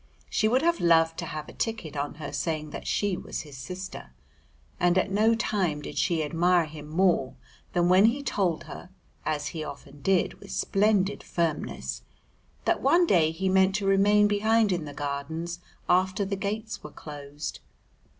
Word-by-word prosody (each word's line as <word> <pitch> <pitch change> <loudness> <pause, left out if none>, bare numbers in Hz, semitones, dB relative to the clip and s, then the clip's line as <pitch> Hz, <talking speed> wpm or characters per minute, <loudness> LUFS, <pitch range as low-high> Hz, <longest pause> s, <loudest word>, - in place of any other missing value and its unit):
She 215 - +2
would 255 +6 +2
have 340 0 +2
loved 165 -1 +4
to 165 - -4
have 155 -2 -5
a - - -11
ticket 205 -10 -3
on 145 +1 -3
her 150 -1 -6
saying 155 -3 -2
that - - -7
she 205 -2 +1
was - - -5
his 145 -3 -12
sister. 180 +8 -7 0.7
And 175 0 +3
at 185 +1 +1
no 220 +3 +4
time 190 -9 0
did - - -7
she 165 -3 +1
admire 170 +3 +3
him 150 -1 -10
more 160 -5 +2 0.4
than 175 0 +3
when 185 +3 +6
he 260 +5 +2
told 185 - 0
her, 180 - -10 0.4
as 150 -1 -1
he 160 -2 -5
often 140 -1 -10
did 190 +3 +1
with - - -13
splendid 205 0 +1
firmness, 150 - -2 0.6
that - - +2
one 340 +7 +5
day 165 - +4
he 180 +4 -2
meant 190 +1 +4
to 205 -1 -1
remain 205 +2 +5
behind 215 +1 +3
in 175 -4 -1
the 145 - -7
Gardens 160 +4 -4 0.3
after 185 +3 +2
the 195 +1 -2
gates 215 +3 -4
were - - -7
closed. 145 0 -7
175 Hz, 175 wpm, -27 LUFS, 155-200 Hz, 0.7 s, when